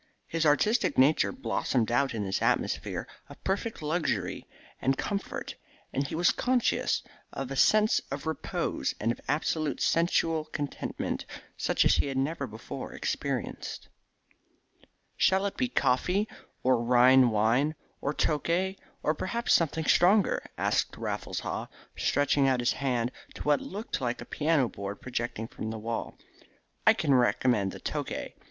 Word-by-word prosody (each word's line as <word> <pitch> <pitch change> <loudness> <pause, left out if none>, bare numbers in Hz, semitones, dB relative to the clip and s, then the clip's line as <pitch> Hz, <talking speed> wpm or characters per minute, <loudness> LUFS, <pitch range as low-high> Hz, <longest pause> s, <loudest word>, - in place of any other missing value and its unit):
His 165 -1 0
artistic 210 +11 +2
nature 140 +4 +4
blossomed 130 - -1
out 130 +1 +2
in 105 -2 -2
this 95 - -1
atmosphere - - 0 0.2
of - - -14
perfect 195 -1 -2
luxury 155 +2 -1 0.3
and 135 +1 +2
comfort, 200 -1 -3 0.4
and 140 +1 0
he - - -5
was 175 +2 +4
conscious 250 -1 +1 0.3
of 135 -1 -5
a - - -2
sense 215 +9 +4
of 135 +3 -5
repose 160 0 -2
and 115 +2 +1
of - - -6
absolute 155 -1 0
sensual 165 -2 +2
contentment 145 -2 -4 0.3
such - - +1
as - - +5
he - - +1
had 135 -1 -3
never 140 +1 -1
before 110 0 -7
experienced. - - -3 1.3
"Shall 190 +1 +3
it 200 - -2
be 255 - 0
coffee, 185 - +1 0.4
or 125 -2 +3
Rhine 125 +1 +6
wine, 115 +8 +2 0.3
or 140 - 0
Tokay, 170 +6 0 0.3
or 155 - +2
perhaps 235 +9 0
something 160 -1 +2
stronger," 190 +6 +4
asked - - 0
Raffles - - -3
Haw, - - -4 0.3
stretching 145 0 +2
out 130 -2 +2
his 120 - +2
hand 125 -3 -1 0.2
to - - -6
what 145 -1 +3
looked 205 -5 -5
like 125 -1 -1
a - - -7
piano 150 -4 +1
board 100 -1 -6
projecting 120 -3 -3
from 110 - -6
the 110 - -4
wall. 115 +1 -4 0.7
"I - - +9
can 140 - +1
recommend 120 -5 +3
the - - -9
Tokay. - - -4
140 Hz, 145 wpm, -29 LUFS, 125-165 Hz, 1.3 s, I